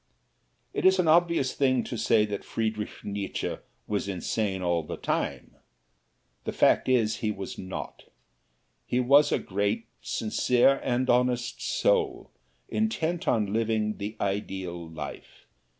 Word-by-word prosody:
It -, -, -2 dB
is 190 Hz, 0 st, +6 dB
an 180 Hz, -3 st, +2 dB
obvious 170 Hz, -4 st, +3 dB
thing 130 Hz, -3 st, +2 dB
to -, -, -5 dB
say 110 Hz, -1 st, +3 dB
that 105 Hz, -1 st, -4 dB
Friedrich 110 Hz, -2 st, -3 dB
Nietzsche 100 Hz, -1 st, -3 dB, 0.3 s
was 100 Hz, -1 st, -2 dB
insane 95 Hz, +1 st, -2 dB
all 85 Hz, -1 st, +1 dB
the 75 Hz, -, -6 dB
time. -, -, -2 dB, 0.9 s
The -, -, -3 dB
fact -, -, +3 dB
is, 115 Hz, -4 st, +2 dB
he 110 Hz, -, -1 dB
was 100 Hz, -2 st, -5 dB
not. 95 Hz, 0 st, -7 dB, 0.8 s
He 125 Hz, -, +1 dB
was 140 Hz, +4 st, +5 dB
a -, -, +3 dB
great, 100 Hz, +3 st, -1 dB, 0.2 s
sincere 125 Hz, +4 st, +2 dB
and 125 Hz, +1 st, 0 dB
honest 125 Hz, -1 st, +1 dB
soul, 460 Hz, -6 st, +1 dB, 0.4 s
intent 190 Hz, -, -1 dB
on 105 Hz, -4 st, +1 dB
living 110 Hz, -1 st, 0 dB
the 105 Hz, +2 st, -5 dB
ideal 95 Hz, -4 st, -3 dB
life. 75 Hz, -3 st, -9 dB
110 Hz, 135 wpm, -27 LUFS, 100-130 Hz, 0.9 s, is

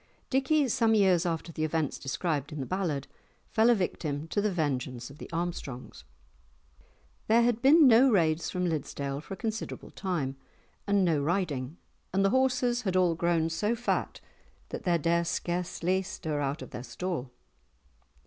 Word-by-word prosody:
Dickie, 275 Hz, +2 st, +3 dB
some 225 Hz, -1 st, +3 dB
years 185 Hz, -4 st, +4 dB
after 165 Hz, 0 st, -3 dB
the 155 Hz, -, -3 dB
events 155 Hz, -2 st, -1 dB
described 145 Hz, +1 st, -2 dB
in 150 Hz, -, -6 dB
the 135 Hz, -, -3 dB
ballad, 165 Hz, -7 st, -2 dB, 0.5 s
fell 225 Hz, +1 st, +4 dB
a 240 Hz, -, +6 dB
victim 155 Hz, -6 st, -2 dB
to 205 Hz, -, 0 dB
the 210 Hz, 0 st, +1 dB
vengeance 130 Hz, -7 st, -2 dB
of 145 Hz, -, -15 dB
the -, -, -9 dB
Armstrongs. 165 Hz, -7 st, -5 dB, 1.2 s
There 230 Hz, +2 st, +5 dB
had 235 Hz, -1 st, +1 dB
been 290 Hz, +3 st, +7 dB
no 250 Hz, +3 st, +7 dB
raids 165 Hz, -6 st, +2 dB
from 180 Hz, 0 st, -1 dB
Liddesdale 140 Hz, -3 st, -3 dB
for 195 Hz, +6 st, -7 dB
a -, -, -23 dB
considerable 220 Hz, 0 st, -5 dB
time, 150 Hz, -9 st, -3 dB, 0.5 s
and 200 Hz, -2 st, +3 dB
no 160 Hz, -4 st, +2 dB
riding, 155 Hz, -3 st, -1 dB, 0.3 s
and 195 Hz, +1 st, +2 dB
the 195 Hz, -, +3 dB
horses 250 Hz, -2 st, +2 dB
had 190 Hz, -5 st, -2 dB
all 180 Hz, -2 st, +4 dB
grown 165 Hz, -1 st, +1 dB
so 210 Hz, +8 st, 0 dB
fat 240 Hz, +1 st, -2 dB, 0.5 s
that -, -, -6 dB
they 175 Hz, -2 st, +3 dB
dare 170 Hz, +2 st, +1 dB
scarcely 175 Hz, +2 st, -1 dB
stir 160 Hz, -5 st, -4 dB
out 140 Hz, -1 st, -2 dB
of 130 Hz, -, -11 dB
the -, -, -6 dB
stall. 170 Hz, -3 st, -4 dB
175 Hz, 165 wpm, -29 LUFS, 150-210 Hz, 1.2 s, been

